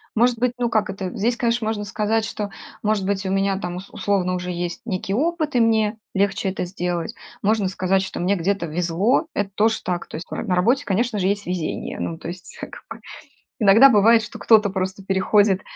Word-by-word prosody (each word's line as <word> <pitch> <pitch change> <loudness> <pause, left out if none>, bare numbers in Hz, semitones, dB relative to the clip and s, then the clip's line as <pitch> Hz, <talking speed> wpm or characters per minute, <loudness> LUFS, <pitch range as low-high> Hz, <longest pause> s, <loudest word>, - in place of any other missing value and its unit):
Может 235 +1 +3
быть, 250 0 +1
ну, 240 -1 0
как 215 -3 +1
это, 190 -1 -4
здесь, 235 +4 0
конечно, 235 -1 0
можно 210 -2 -2
сказать, 215 +2 0
что, 210 -2 -4 0.3
может 210 -2 0
быть, 200 0 -1
у - - -1
меня 195 0 +1
там 175 -3 -4
ус 190 - -9
условно 185 -3 0
уже 180 0 -4
есть 175 0 -4
некий 195 -2 -3
опыт 310 +2 0
и - - +4
мне 220 -1 +2 0.2
легче 195 0 +1
это 190 - -3
сделать. 175 -2 -3 0.3
Можно 210 -1 +2
сказать, 190 0 +1
что 190 - -5
мне 195 +3 +2
где-то 180 0 -1
везло- 180 - +1
это 205 -1 -1
тоже 220 +2 +1
так. 180 -1 -3
То - - -9
есть 165 - -7
на 180 - -1
работе, 240 +10 +2
конечно 215 +2 0
же, 185 - +1
есть 205 +1 -1
везение. 175 -3 -3
Ну, 165 - -3
то 165 - -7
есть 175 0 -10
как - - -7 0.2
бы - - -9 0.6
иногда 220 +6 +7
бывает, 225 +1 +5
что - - -9
кто-то 215 -3 +4
просто 190 0 -3
переходит 195 0 +2
200 Hz, 205 wpm, -22 LUFS, 185-220 Hz, 0.6 s, иногда